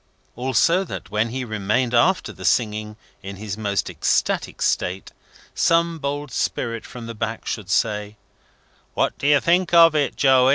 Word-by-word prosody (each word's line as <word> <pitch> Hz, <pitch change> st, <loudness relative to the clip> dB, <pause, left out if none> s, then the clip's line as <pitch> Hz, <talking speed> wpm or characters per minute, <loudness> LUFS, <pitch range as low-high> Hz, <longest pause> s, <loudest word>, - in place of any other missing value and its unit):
Also 135 Hz, +9 st, +2 dB
that 100 Hz, -, -8 dB
when 110 Hz, +2 st, 0 dB
he 130 Hz, +2 st, -4 dB
remained 110 Hz, +3 st, -1 dB
after 175 Hz, +10 st, +2 dB
the -, -, -11 dB
singing 105 Hz, -2 st, 0 dB, 0.2 s
in 100 Hz, 0 st, -7 dB
his 100 Hz, 0 st, -5 dB
most 100 Hz, -2 st, -2 dB
ecstatic -, -, -1 dB
state, 95 Hz, +2 st, -1 dB, 0.4 s
some 165 Hz, 0 st, +2 dB
bold 145 Hz, -1 st, -4 dB
spirit 115 Hz, -1 st, -2 dB
from 120 Hz, -2 st, -9 dB
the 115 Hz, -, -6 dB
back 115 Hz, 0 st, -4 dB
should 100 Hz, -4 st, -4 dB
say, 105 Hz, +1 st, 0 dB, 0.8 s
"What -, -, +1 dB
do 140 Hz, -, -1 dB
you 145 Hz, -1 st, +5 dB
think 175 Hz, +2 st, +2 dB
of 165 Hz, -1 st, +8 dB
it, 145 Hz, -3 st, 0 dB
Joey?" 130 Hz, -2 st, +4 dB
120 Hz, 160 wpm, -22 LUFS, 105-145 Hz, 0.8 s, of